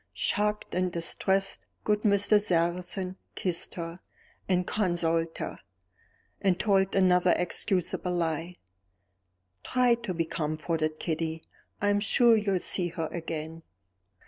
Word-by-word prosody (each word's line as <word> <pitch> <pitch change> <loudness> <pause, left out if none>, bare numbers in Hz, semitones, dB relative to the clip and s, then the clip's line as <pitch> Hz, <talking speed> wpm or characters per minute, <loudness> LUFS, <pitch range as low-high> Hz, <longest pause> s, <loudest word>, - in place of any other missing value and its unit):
Shocked 210 0 0
and 180 0 0
distressed, 190 +3 0 0.2
good 210 0 +1
Mr. 205 0 +4
Sarrazin 180 +1 -1 0.2
kissed 175 -3 -2
her, 170 0 -6 0.5
and 180 -1 +2
consoled 165 -5 0
her, - - -5 0.8
and 185 -3 +2
told 195 -2 +2
another 180 -2 +4
excusable 180 0 -1
lie. 165 +1 -2 1.1
"Try 250 -1 +3
to 235 -6 -3
be 165 0 0
comforted, 155 0 -2
Kitty; 160 -1 -3 0.4
I'm 205 0 +3
sure 230 +3 +5
you 210 -2 +1
will - - +3
see 180 0 -1
her 165 -2 -4
again." 165 -1 -5
180 Hz, 120 wpm, -28 LUFS, 165-200 Hz, 1.1 s, sure